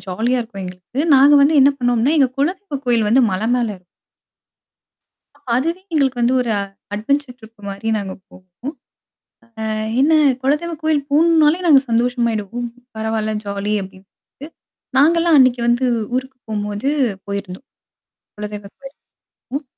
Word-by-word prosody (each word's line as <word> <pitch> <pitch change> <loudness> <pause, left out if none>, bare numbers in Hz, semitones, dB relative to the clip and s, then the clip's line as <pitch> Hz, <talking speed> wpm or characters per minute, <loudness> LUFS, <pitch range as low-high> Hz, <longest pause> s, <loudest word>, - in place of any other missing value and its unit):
ஜாலியா 225 +7 -1
இருக்கும் 210 -4 -7
எங்களுக்கு. 180 +8 -6
நாங்க 275 +2 +6
வந்து 285 +3 +4
என்னா 275 +2 +6
பண்ணுவோம்ன்னா, 245 +4 +1
எங்க 270 -3 +4
குலதெய்வம் 300 -1 -2
கோயில் 230 -3 +2
வந்து 255 +5 +4
மலை 190 +4 -2
மேலே 235 -3 -1
இ - - -30 1.7
அதுவே 330 +8 -1
எங்களுக்கு 270 -5 +1
வந்து 240 +2 +2
ஒரு 240 -2 -2 0.4
அட்வென்ச்சர் 255 +4 -2
ட்ரிப் 220 -1 -17
மாரி 200 +3 -5
நாங்க 195 -2 -5 0.2
போவோம். 185 - -10 0.9
அ - - -2 0.3
என்னா! 310 +3 +4 0.2
குலதெய்வம் 300 +4 -1
கோயில் 315 -2 +1
போணும்னாலே, 315 +1 +4
நாங்க 290 -5 +7
சந்தோஷமாயிடுவோம். 235 -1 -1 0.3
பரவாயில்ல, 220 0 -2
ஜாலி 200 +1 -3
அப்படின்ட்டு. 195 +9 -14 0.5
நாங்கலாம் 330 +3 +4
அன்னைக்கு 255 -2 +4
வந்து 240 +2 +2 0.3
ஊருக்கு 260 +1 -3
போம்போது 210 +3 -3 0.4
போயிருந்தோம் 200 +4 -6 0.7
குலதெய்வம் 210 -1 -7
கோவிலுக்கு. 275 +1 -13 0.6
ம், 290 - -5
245 Hz, 125 wpm, -19 LUFS, 210-285 Hz, 1.7 s, நாங்க